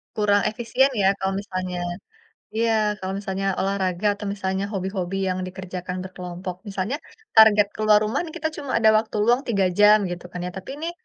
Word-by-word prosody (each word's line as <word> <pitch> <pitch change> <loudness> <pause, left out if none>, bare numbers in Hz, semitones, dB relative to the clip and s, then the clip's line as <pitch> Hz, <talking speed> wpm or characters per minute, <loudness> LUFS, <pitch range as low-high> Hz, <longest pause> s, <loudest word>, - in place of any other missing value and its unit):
Kurang 205 -1 +3
efisien 240 +5 +1
ya 190 - +4
kalau 190 0 -1
misalnya 185 -2 -4 0.8
iya 230 0 +2 0.3
kalau 190 0 -4
misalnya 195 -1 -3 0.2
olahraga 190 0 0
atau 205 +1 -8
misalnya 190 -1 -2
hobi-hobi 190 -1 -3
yang 185 0 -1
dikerjakan 185 -1 -6
berkelompok. 180 -1 -6
Misalnya 200 +7 -2 0.4
target 210 -2 +7
keluar 215 -1 +4
rumah 215 - -1
nih 320 - -9
kita 315 +1 -1
cuma 280 -3 -5
ada 220 -1 +5
waktu 220 0 -2
luang 240 +4 +3
3 200 -5 +2
jam 210 +1 +7
gitu 175 0 -6
kan 180 - -6
ya, 180 - -4
tapi 190 +6 -7
nih 335 +1 -2
195 Hz, 175 wpm, -23 LUFS, 185-215 Hz, 0.8 s, target